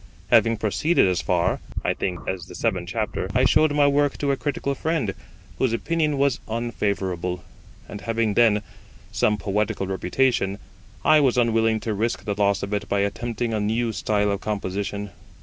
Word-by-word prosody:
Having 115 -1 +5
proceeded 110 - +2
as 90 -3 +1
far, 85 -1 +1 0.2
I - - +1
think, 90 -2 -3
as 95 -3 -3
the - - -10
seventh - - -1
chapter, - - -2
I - - +4
showed 155 -1 +4
my 145 0 +3
work 145 0 +2
to 140 -1 0
a - - +2
critical 140 +1 -2
friend, 155 -8 -1 0.5
whose 130 -3 +2
opinion 155 +3 0
was 140 -2 +2
unfavourable; 100 -6 -2 0.4
and 105 - -8
having 115 -2 0
then 105 -2 +4 0.5
some 105 0 +2
poetical 105 0 -1
reputation, 95 +2 0 0.5
I 155 - +6
was 130 -4 +2
unwilling 115 -2 +2
to 110 - -2
risk 115 +3 -2
the 105 - 0
loss 100 -1 +1
of 100 +1 -4
it 100 -1 -2
by 100 - +1
attempting 115 +3 -2
a 110 - 0
new 110 +2 0
style 105 -1 +1
of 100 - -2
composition. 100 0 -3
110 Hz, 170 wpm, -24 LUFS, 100-120 Hz, 0.5 s, I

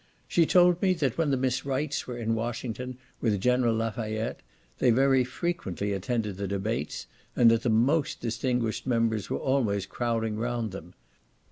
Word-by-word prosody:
She 165 -2 +3
told 180 -1 +5
me, 185 -2 +3
that 140 -8 0
when 160 -3 +2
the 135 - +2
Miss 130 -1 0
Wrights 140 +2 -2
were 125 -1 -5
in 115 -1 -1
Washington, 120 +2 -4 0.2
with 105 -4 +1
General 125 +1 +2
Lafayette, 110 0 -2 0.4
they 125 - +4
very 130 +2 +4
frequently 125 - -3
attended 105 0 -2
the 100 0 -3
debates, 100 +4 -3 0.3
and 115 -2 +6
that 115 0 +2
the 120 - 0
most 130 +8 +2
distinguished 120 0 -1
members 115 -4 +1
were - - -1
always 110 -8 0
crowding 115 -2 -2
round 120 -1 -2
them. 90 -1 -10
120 Hz, 160 wpm, -28 LUFS, 110-130 Hz, 0.4 s, and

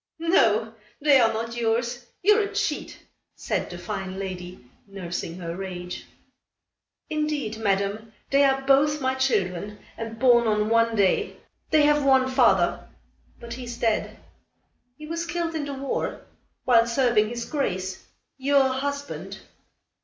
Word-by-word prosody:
"No! 225 - +2 0.3
they 285 -2 +5
are 225 -2 +4
not 230 +1 -4
yours. 240 +1 -1 0.2
You're 420 +3 +5
a 410 0 -4
cheat," 410 -8 -2 0.4
said - - -2
the 175 - -7
fine 185 +2 -5
lady, 180 -6 -7 0.2
nursing 175 -3 -5
her 170 -2 -5
rage. 180 -2 -6 1.0
"Indeed, 300 -8 -2
Madame, 200 +1 -1 0.2
they 280 +1 +5
are 270 -1 +2
both 285 +2 +3
my 260 -1 0
children 205 -6 -1 0.2
and 225 0 -6
born 240 -1 +5
on 210 0 +1
one 230 0 +3
day. 200 -3 +1 0.3
They 310 -1 +4
have 295 0 +4
one 265 -1 +4
father, 260 -2 +2 0.5
but 235 -1 -8
he 250 +1 -7
is 240 0 -7
dead. 225 -2 -1 0.8
He 305 - -9
was 335 +2 -4
killed 340 -1 -2
in 310 -2 -2
the 285 -1 -5
war, 270 0 -3 0.4
while 235 -3 +5
serving 235 -3 +2
his 235 0 -4
grace, 190 -10 -3 0.4
your 275 0 +3
husband." 280 +2 -4
235 Hz, 140 wpm, -25 LUFS, 210-280 Hz, 1.0 s, they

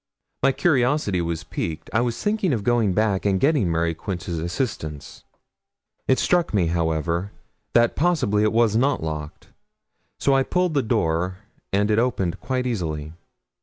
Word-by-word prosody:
My 135 - +4
curiosity 130 - +1
was 85 -1 -3
piqued. 80 -2 -5
I 110 - +3
was 120 -1 -2
thinking 205 -6 +1
of 110 -4 -2
going 115 -4 +2
back 105 -2 +1
and 95 -2 +1
getting 135 - +2
Mary 85 0 +1
Quince's 85 0 -4
assistance. 80 - -4 0.8
It 130 - +4
struck 175 0 +1
me, 95 -4 +3
however, 85 +3 -1 0.4
that 120 0 +4
possibly 145 - +2
it 105 0 +3
was 115 -2 +3
not 135 - +2
locked, 75 -1 -6 0.7
so 140 - +2
I 135 - +4
pulled 180 +4 0
the 140 - +2
door 90 -6 0 0.3
and 105 +2 +2
it 105 - +3
opened 100 -8 0
quite 130 0 -2
easily. 80 -10 -3
105 Hz, 155 wpm, -23 LUFS, 85-130 Hz, 0.8 s, My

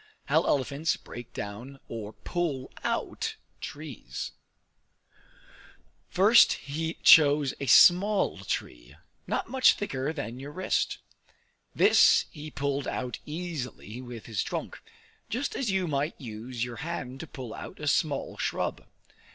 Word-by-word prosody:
How - - +3
Elephants 140 +3 0
Break 120 -1 -10
Down 120 +7 -7
or 110 -2 -6
Pull 150 -6 -3
Out - - -2 0.2
Trees 145 -4 -7 1.8
First 210 +5 +6
he 160 +3 -4
chose 145 -3 +7
a 140 - -4
small 190 - +6
tree, - - -5 0.3
not - - -1
much 260 -1 +6
thicker 140 -7 -2
than 130 -6 -5
your 140 +2 -8
wrist; 185 +2 0 0.8
this - - +6
he 150 -1 -8
pulled 140 -1 -2
out 125 -1 -3
easily 150 -8 -5
with 120 -3 -9
his 110 -4 -2
trunk, - - -5 0.5
just 255 +5 -2
as 260 -5 -1
you 190 -2 +1
might 145 +1 -1
use 120 0 -5
your 120 -1 -7
hand 135 -6 -5
to 165 - -7
pull 125 -6 -8
out - - -9
a 150 - -4
small 145 0 0
shrub. - - -2
140 Hz, 125 wpm, -28 LUFS, 125-165 Hz, 1.8 s, chose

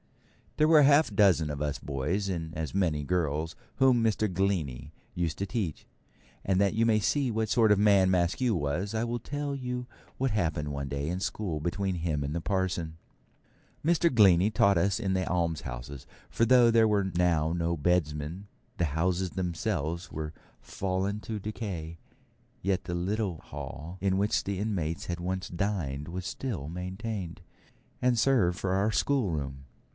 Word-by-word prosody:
There 155 - +4
were 160 -1 +7
a - - +7
half 145 -3 +5
dozen 95 -7 +4
of 75 -1 -4
us 75 -2 -2
boys, 75 +9 -2
and 80 -4 -3
as 80 0 -4
many 85 -6 +1
girls, 80 -1 -1 0.2
whom 130 -3 +4
Mr. 110 -2 +1
Glennie 90 -9 -1 0.2
used 85 -2 -1
to 100 - -2
teach; 100 - -3 0.6
and 95 -1 +1
that 100 -1 +3
you 115 +1 +2
may 110 -2 +4
see 135 +4 +1
what 110 -1 -1
sort 110 -2 +4
of 105 - +4
man 100 -3 +5
Maskew 95 +7 +2
was, 85 +6 -2
I 110 0 0
will 120 0 -2
tell 145 +3 -4
you 125 -2 -4 0.3
what 135 -1 0
happened 80 -7 -1
one 70 -1 -4
day 70 +1 -3
in 90 +2 -2
school 95 -5 -2
between 90 +4 -1
him 80 -4 -1
and 70 +2 -3
the 85 - -2
parson. 90 -4 -1 0.9
Mr. 170 -1 +3
Glennie 100 -4 +6
taught 100 -2 +4
us 95 +5 +1
in 95 -4 -1
the 95 0 0
almshouses; 70 -7 -3 0.2
for 115 - +2
though 120 0 +6
there 115 -1 +5
were 105 -2 +2
now 85 -3 +2
no 85 0 -1
bedesmen, 75 -2 +1
and 95 +4 -10 0.3
the 85 - +2
houses 90 +4 0
themselves 85 -2 -2
were 75 0 -5 0.3
fallen 95 +2 -2
to 110 -1 -4
decay, 95 -6 -5 0.7
yet 95 0 0
the 90 - -3
little 95 0 -1
hall 80 +3 -8
in 95 -1 +1
which 105 +2 +1
the 100 -1 -3
inmates 90 -7 -2
had 85 -1 -4
once 90 -1 -3
dined 85 -7 -2
was 90 +2 -5
still 100 - -4
maintained, 90 +1 -5 0.6
and 125 -1 +3
served 110 -9 +3
for 95 - -1
our 100 +3 +2
schoolroom. 80 - -1
95 Hz, 170 wpm, -29 LUFS, 80-105 Hz, 0.9 s, were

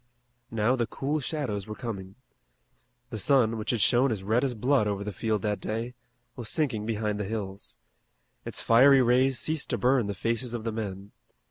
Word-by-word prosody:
Now 115 +3 +1
the 120 -3 -1
cool 145 +5 -2
shadows 130 - -3
were 105 - -6
coming. 100 -6 -6 1.0
The 110 - -4
sun, 120 -1 +3
which 105 - -4
had 120 -4 +1
shown 125 +5 +4
as 100 -4 -3
red 110 +6 +1
as 130 -3 -1
blood 125 0 +2
over 100 -1 -2
the 105 0 -5
field 110 +1 -1
that 105 -1 -1
day, 115 +3 -3 0.4
was 120 -4 -5
sinking 115 -9 -1
behind 105 -2 -1
the - - -1
hills. 100 -2 -5 0.7
Its - - -3
fiery 130 +3 +6
rays 130 +2 +3
ceased 155 -2 -1
to - - 0
burn 125 -3 +2
the 100 - -3
faces 115 +4 -1
of 115 - -5
the 115 - -2
men. 100 -2 -5
115 Hz, 190 wpm, -28 LUFS, 105-125 Hz, 1.0 s, fiery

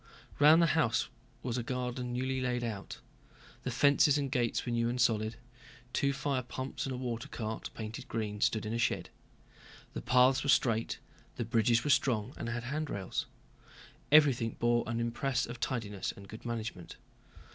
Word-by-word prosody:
Round 155 +3 +7
the 165 - +3
house 120 -9 +2 0.3
was 125 0 -1
a - - -1
garden 125 0 -3
newly 130 +1 -1
laid 125 -1 -1
out. 110 -4 -5 0.6
The - - -3
fences 145 0 +4
and 140 -2 -2
gates 120 -4 0
were 120 - -2
new 115 0 +1
and 125 +1 -2
solid; 110 -2 +2 0.6
two 140 - +2
fire 135 -1 -1
pumps 130 +2 -5
and 130 - -3
a - - -5
water 120 -2 -4
cart, 110 -1 -5
painted 110 0 -6
green, 105 -2 -3
stood 110 -1 +2
in 110 - -3
a 115 - -1
shed; - - 0 0.8
the - - -4
paths 130 +1 +4
were 140 - -2
straight, 115 -4 +2 0.4
the 120 - -3
bridges 115 0 +3
were 145 - +2
strong 120 -3 +2
and - - -5
had 120 0 -3
handrails. 135 -8 -3 0.8
Everything 135 -7 +5
bore 120 0 +2
an 115 0 -1
impress 120 +2 0
of 120 0 -8
tidiness 105 -7 -2
and 100 0 -12
good 110 +4 -10
management. 110 -7 -5
120 Hz, 170 wpm, -32 LUFS, 115-130 Hz, 0.8 s, Round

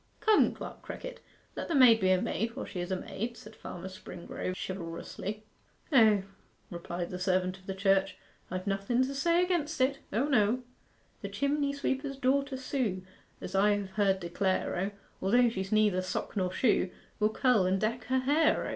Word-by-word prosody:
'Come, 435 -1 +4
Clerk - - -8
Crickett, - - -7 0.4
let - - -4
the 330 - -1
maid 245 -4 +7
be 190 -2 +2
a 185 -1 +4
maid 230 +5 -2
while 265 - -4
she 180 - -6
is 175 +1 -3
a - - +2
maid,' 230 +6 -5
said 215 0 -12
Farmer 180 -3 -7
Springrove 185 -1 -6
chivalrously. 190 +4 -5 0.5
'O,' 220 -7 +6 0.5
replied 175 0 -5
the 180 - -5
servant 185 0 0
of 190 - -21
the 195 - -3
Church; 195 0 +2 0.3
'I've 185 +1 -4
nothen 200 +5 +1
to 270 +2 -2
say 335 +5 +3
against 325 -5 -1
it 270 +2 +2
O 230 +7 +1
no: 245 -2 +2 0.6
'"The - - -5
chimney 280 0 0
sweeper's 275 0 -2
daughter 270 +1 +1
Sue 250 -8 -2 0.4
As 180 - -6
I 205 +2 +4
have 200 -2 -4
heard 195 -1 +2
declare, 185 +2 -1
O, 190 +3 -1 0.3
Although 240 +5 +4
she's 190 -3 -4
neither 210 -4 +3
sock 185 - -4
nor 185 -3 0
shoe 200 -2 +2 0.3
Will 215 0 +3
curl 220 -4 +3
and 190 +1 +1
deck 220 +3 -1
her 260 0 +1
hair, 295 +5 +3
O." - - -3
210 Hz, 180 wpm, -30 LUFS, 190-260 Hz, 0.6 s, maid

